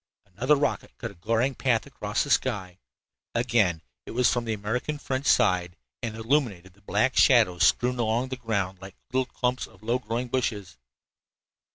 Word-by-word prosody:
Another 130 +9 +3
rocket 145 0 -2
cut - - -5
a - - -14
glaring 115 +9 0
path 120 -3 +1
across - - -2
the - - -4
sky. 95 -2 0 0.6
Again 105 -9 +2 0.2
it - - -7
was 125 - +4
from 120 -1 -1
the 115 - -1
American 110 +8 -2
French 135 -1 -3
side 90 -1 +3 0.2
and 110 -2 -4
illumined 115 -5 0
the 95 +2 -19
black 100 - +1
shadows 90 -1 +5
strewn 125 0 +2
along 120 +3 0
the 130 - -3
ground 100 -6 -2
like 95 0 -10 0.2
little 130 -1 +1
clumps 125 0 -1
of - - -20
low 120 +3 +1
growing 115 +3 -3
bushes. 110 - -2
115 Hz, 170 wpm, -26 LUFS, 100-125 Hz, 0.6 s, shadows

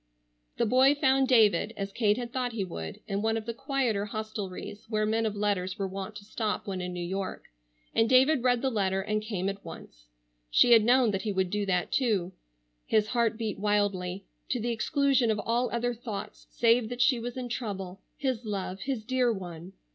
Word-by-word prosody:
The - - +2
boy 260 +5 +5
found 270 -2 +3
David, 220 -3 +4
as 195 0 -3
Kate 210 0 +2
had 240 -1 -5
thought 250 -2 -1
he 215 -3 -1
would, 80 - -7
in 200 -1 -1
one 225 +1 +1
of 220 - -5
the 230 - -3
quieter 255 -5 -1
hostelries 210 -2 -6
where 215 -1 +1
men 220 +1 +1
of 210 - -3
letters 200 -2 -1
were 195 -2 -1
wont 195 +2 -6
to 205 0 -10
stop 215 0 -2
when 190 -2 -3
in 180 0 -4
New 175 -1 -4
York, 190 +2 -4 0.5
and 225 0 +3
David 265 +2 +5
read 245 -1 +2
the 265 - +1
letter 195 -3 0
and 215 +1 -1
came 205 -4 -3
at 200 0 -4
once. - - -11 0.4
She 240 - +5
had 225 -2 +8
known 245 0 +4
that 195 -1 -2
he 210 - -2
would 190 -2 0
do 205 -1 -1
that, 180 -2 0
too. 205 -9 +1 0.6
His 215 -1 +2
heart 235 -2 +1
beat 220 -3 -3
wildly, 200 -2 0 0.2
to 250 - 0
the 235 +2 -1
exclusion 270 +1 +2
of 215 - +2
all 235 +3 0
other 240 +1 -1
thoughts 225 -3 -7
save 230 -1 +3
that 245 0 +1
she 255 -2 +3
was 240 +2 -5
in 250 -1 -3
trouble, 195 -6 -5 0.2
his 260 -4 -1
love, 195 -3 -4
his 260 -1 -3
dear 250 +1 +2
one. 180 -3 -7
215 Hz, 205 wpm, -28 LUFS, 195-245 Hz, 0.6 s, had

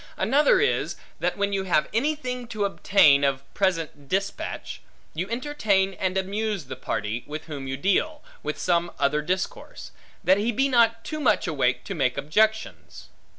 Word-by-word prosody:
Another 280 - +4
is, 455 - +1 0.2
that - - -1
when 200 0 0
you 195 -1 -1
have 160 -5 +2
anything 250 -1 -1
to 215 -3 -2
obtain, 185 -8 +4
of 135 -1 +1
present 165 -7 -1
despatch, 195 +1 -3 0.3
you 180 +5 -3
entertain 220 -7 0
and 185 0 -2
amuse 200 -2 -2
the 130 0 -7
party, 105 +1 -3
with 155 +1 -6
whom 145 -4 -6
you 135 0 -3
deal, 290 - 0 0.2
with 150 - -4
some 170 -1 +1
other 145 +2 +1
discourse; 190 - -4 0.3
that 190 +2 +4
he 225 +3 +1
be 270 +5 +2
not 230 -3 +3
too 310 - -4
much 210 -10 +2
awake 135 -6 0
to 200 - -5
make 135 -7 0
objections. 215 +10 -1
195 Hz, 160 wpm, -25 LUFS, 150-230 Hz, 0.3 s, Another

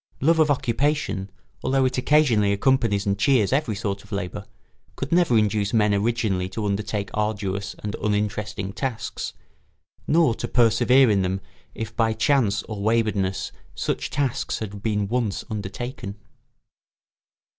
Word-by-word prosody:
Love 160 +4 +3
of 155 -1 +4
occupation, 135 -6 0 0.3
although 135 0 +2
it 130 - 0
occasionally 125 -7 +3
accompanies 105 -2 +2
and 100 0 0
cheers 125 -3 +3
every 135 -6 +1
sort 100 -1 -3
of 100 - -19
labour, 100 +1 -4 0.5
could 135 - -5
never 170 -9 +4
induce 105 0 +1
men 105 -2 +3
originally 100 -3 0
to 110 +2 -4
undertake 105 0 -2
arduous 100 -2 -2
and 105 0 -3
uninteresting 105 -1 -2
tasks, 130 -3 -4 0.7
nor 160 -6 +4
to - - -4
persevere 120 +1 +4
in 100 -2 +3
them 95 +1 -1 0.4
if 110 - -5
by 115 -1 +2
chance 110 -6 +2
or 105 -2 -6
waywardness 105 -3 0 0.2
such - - -2
tasks 140 -4 -1
had 105 -2 -6
been 105 -2 0
once 115 -3 -1
undertaken. 105 +1 -5
110 Hz, 135 wpm, -24 LUFS, 100-125 Hz, 0.7 s, of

